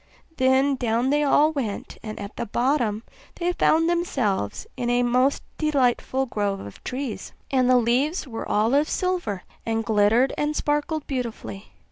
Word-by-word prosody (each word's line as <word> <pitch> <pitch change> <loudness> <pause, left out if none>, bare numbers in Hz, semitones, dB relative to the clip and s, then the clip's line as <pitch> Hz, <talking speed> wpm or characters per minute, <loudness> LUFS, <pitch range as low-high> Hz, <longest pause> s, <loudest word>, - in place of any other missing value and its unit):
Then 265 +1 +3
down 240 +1 +1
they 295 +1 +3
all 295 +1 +4
went, 245 -10 -4
and 215 -1 -7
at 200 0 -7
the - - -4
bottom 235 -2 0 0.3
they 350 0 0
found 325 -1 +3
themselves 260 - -1
in 245 -2 -2
a 245 0 +3
most 250 +3 +2 0.2
delightful 270 -3 +1
grove 205 -5 -2
of 100 - -10
trees; 255 -6 -5 0.2
and 255 -2 +3
the 255 - +6
leaves 260 +8 +1
were 225 -3 -6
all 220 +4 +2
of 290 +3 +3
silver, 355 - -1 0.2
and 225 -1 -1
glittered 220 +5 +3
and 295 +1 0
sparkled 295 +1 -1
beautifully. 225 - -5
255 Hz, 155 wpm, -24 LUFS, 225-290 Hz, 0.3 s, the